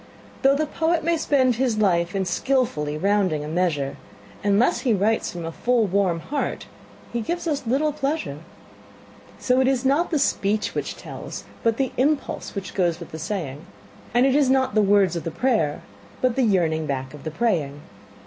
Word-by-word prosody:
Though 270 Hz, +1 st, +5 dB
the 310 Hz, +2 st, +1 dB
poet 325 Hz, +2 st, 0 dB
may 335 Hz, +1 st, +2 dB
spend 265 Hz, -6 st, +2 dB
his 250 Hz, -4 st, +1 dB
life 180 Hz, -3 st, +2 dB
in 190 Hz, -1 st, 0 dB
skilfully 180 Hz, -, 0 dB
rounding 190 Hz, -4 st, +1 dB
a -, -, -6 dB
measure, 155 Hz, -4 st, -1 dB, 0.5 s
Unless 205 Hz, +4 st, +3 dB
he 235 Hz, -5 st, +2 dB
writes 215 Hz, +3 st, +1 dB
from 170 Hz, -2 st, -6 dB
a 165 Hz, -, -4 dB
full, 240 Hz, +5 st, +1 dB
warm 190 Hz, -3 st, +1 dB
heart 285 Hz, -, -3 dB, 0.5 s
he 235 Hz, -, -1 dB
gives 345 Hz, +11 st, -3 dB
us 290 Hz, -6 st, -2 dB
little 290 Hz, +5 st, +1 dB
pleasure. 280 Hz, -, -2 dB, 1.0 s
So 250 Hz, 0 st, +2 dB
it 260 Hz, -, +2 dB
is 265 Hz, -1 st, +1 dB
not 285 Hz, +6 st, +2 dB
the 320 Hz, -, +1 dB
speech 210 Hz, -5 st, 0 dB
which -, -, -3 dB
tells, -, -, -8 dB, 0.2 s
but 230 Hz, -1 st, +1 dB
the 270 Hz, -2 st, 0 dB
impulse 280 Hz, -1 st, 0 dB
which 195 Hz, -1 st, -5 dB
goes 175 Hz, -3 st, +1 dB
with 170 Hz, -, -10 dB
the 160 Hz, -, -7 dB
saying; 160 Hz, -5 st, -4 dB, 0.5 s
And 245 Hz, +3 st, +4 dB
it 270 Hz, -, +3 dB
is 280 Hz, -2 st, +3 dB
not 265 Hz, -2 st, +2 dB
the 215 Hz, -, +4 dB
words 200 Hz, -3 st, +3 dB
of 170 Hz, -, -3 dB
the 165 Hz, -, -2 dB
prayer, 165 Hz, -, 0 dB, 0.4 s
but 255 Hz, -2 st, +1 dB
the 270 Hz, -, +2 dB
yearning 165 Hz, -8 st, +2 dB
back 135 Hz, -1 st, -3 dB
of 150 Hz, -, -11 dB
the 155 Hz, -, -3 dB
praying. 155 Hz, -7 st, -1 dB
210 Hz, 185 wpm, -23 LUFS, 170-265 Hz, 1.0 s, Though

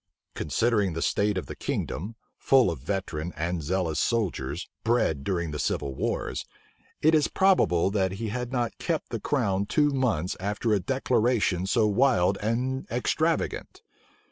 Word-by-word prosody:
Considering 105 Hz, +3 st, +1 dB
the 80 Hz, -, -3 dB
state 105 Hz, -1 st, +1 dB
of 95 Hz, -, -3 dB
the -, -, -7 dB
kingdom, 100 Hz, +9 st, -3 dB, 0.2 s
full 130 Hz, -8 st, +4 dB
of 80 Hz, -, -6 dB
veteran 85 Hz, -1 st, -3 dB
and 80 Hz, +2 st, -2 dB
zealous 85 Hz, 0 st, -1 dB
soldiers, 85 Hz, -, -1 dB, 0.2 s
bred 110 Hz, -, +1 dB
during 85 Hz, -3 st, -1 dB
the 75 Hz, -, -4 dB
civil 70 Hz, -1 st, -1 dB
wars, -, -, -2 dB, 0.6 s
it 155 Hz, +2 st, +5 dB
is 155 Hz, -2 st, +4 dB
probable 140 Hz, -, +3 dB
that 95 Hz, -2 st, 0 dB
he 110 Hz, +3 st, -4 dB
had 125 Hz, +2 st, -4 dB
not 120 Hz, -3 st, -1 dB
kept -, -, -2 dB
the -, -, -3 dB
crown 95 Hz, 0 st, 0 dB
two 145 Hz, +3 st, +2 dB
months 115 Hz, -, 0 dB
after 105 Hz, +3 st, -1 dB
a 105 Hz, -, +3 dB
declaration 115 Hz, -4 st, +1 dB
so 110 Hz, +2 st, +3 dB
wild 105 Hz, -3 st, +3 dB
and 125 Hz, +5 st, -1 dB
extravagant. 160 Hz, +7 st, -1 dB
105 Hz, 150 wpm, -27 LUFS, 90-120 Hz, 0.6 s, it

